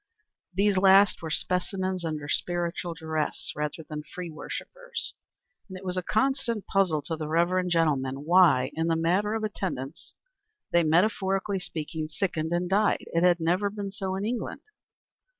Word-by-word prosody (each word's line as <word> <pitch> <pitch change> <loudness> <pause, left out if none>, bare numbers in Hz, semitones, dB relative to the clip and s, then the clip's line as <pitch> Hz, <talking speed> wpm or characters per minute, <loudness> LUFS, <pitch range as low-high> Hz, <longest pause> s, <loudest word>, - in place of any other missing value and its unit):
These 200 +1 +2
last 195 +1 +6
were 160 - -4
specimens 185 +4 -1
under 155 -3 -3
spiritual 175 +1 -1
duress 160 -2 -2
rather 150 +2 -3
than 150 -1 -5
free 175 +2 -7
worshippers, - - -6 0.6
and 190 - -7
it 190 - -11
was 180 0 -1
a 185 - 0
constant 230 +1 0
puzzle 180 -7 +1
to 160 +3 -2
the 155 -1 -5
reverend 175 +3 +2
gentleman 145 -5 +1
why, 165 -7 +5
in 160 +1 -1
the 165 - +2
matter 185 +6 +1
of 220 - -2
attendance, 170 -8 -4 0.6
they, 170 - +5
metaphorically 190 +3 +2
speaking, 155 -2 -4
sickened 160 -2 -2
and 175 +1 0
died. 205 +3 +2
It 165 - +2
had 175 -1 +4
never 180 +5 +1
been 200 -1 -5
so 195 -2 -3
in 195 +2 -2
England. 235 +2 -3
180 Hz, 155 wpm, -27 LUFS, 160-195 Hz, 0.6 s, last